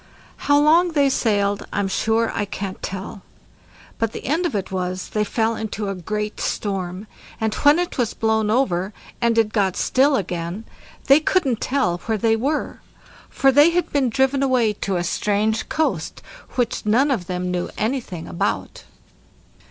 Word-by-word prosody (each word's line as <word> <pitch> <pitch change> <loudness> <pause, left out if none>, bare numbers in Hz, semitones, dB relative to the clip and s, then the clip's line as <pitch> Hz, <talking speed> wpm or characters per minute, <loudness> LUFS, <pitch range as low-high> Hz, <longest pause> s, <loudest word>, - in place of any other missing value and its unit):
How 285 - +6
long 330 +4 +4
they 285 -2 +3
sailed 205 -4 0
I'm 200 -1 0
sure 225 +4 +1
I - - -1
can't 195 -1 -6
tell; 190 +1 -6 0.8
but 225 -1 -1
the - - -7
end 325 +7 +1
of 280 - -5
it 195 -2 -3
was, 185 0 -3
they 215 - 0
fell 225 +2 0
into 215 -2 -4
a - - -1
great 210 +4 -4
storm, 190 -1 -3 0.3
and 220 -1 0
when 290 +2 +4
it 355 -5 -2
was 235 -3 0
blown 220 -1 +1
over, 205 -5 +1 0.3
and 235 -1 +2
it 220 -1 +2
got 195 -4 +1
still 275 +2 +3
again, 180 0 -3 0.4
they 275 +2 +6
couldn't 290 - +1
tell 185 -11 0
where 220 -1 +1
they 225 +2 +2
were; 280 +7 -2 0.5
for 270 - +3
they 290 +4 +6
had 350 +1 -1
been 275 -4 +2
driven 265 +3 +1
away 250 -5 +2
to 195 -1 -3
a 175 - 0
strange 210 +4 0
coast, 315 0 -2 0.3
which 245 -2 -1
none 250 +7 +3
of 195 -10 -1
them 180 0 -2
knew 180 -1 -2
anything 220 -7 -3
about. 85 -1 -3
220 Hz, 165 wpm, -22 LUFS, 195-265 Hz, 0.8 s, How